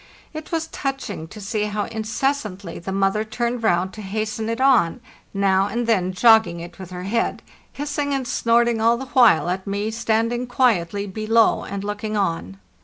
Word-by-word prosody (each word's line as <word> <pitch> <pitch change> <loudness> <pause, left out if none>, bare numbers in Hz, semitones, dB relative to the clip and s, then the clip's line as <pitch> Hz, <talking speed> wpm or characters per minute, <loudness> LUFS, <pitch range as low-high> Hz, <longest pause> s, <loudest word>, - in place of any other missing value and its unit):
It 310 0 -8
was 325 -1 -1
touching 270 - -4
to 215 - -11
see 210 +1 -2
how 210 0 -2
incessantly 220 -4 -3
the 190 - -6
mother 195 +2 +1
turned 235 +2 -2
round 185 -3 +1
to 215 - -8
hasten 215 +2 -3
it 230 - -2
on, 255 -8 +3 0.3
now 195 -1 +2
and 235 +3 -2
then 190 -5 +1
jogging 220 -2 +4
it 170 +2 -10
with 185 -2 -8
her 180 -1 -7
head, 230 +5 -1 0.3
hissing 290 0 -3
and 270 -2 -1
snorting 235 -1 +2
all 230 +1 +4
the 265 +1 -7
while 235 - +5
at 185 +2 -3
me 205 +2 -2
standing 230 +2 0
quietly 205 -6 +1
below 215 +3 +2
and 200 0 -5
looking 210 +1 -3
on. 165 - -2
215 Hz, 175 wpm, -22 LUFS, 195-235 Hz, 0.3 s, while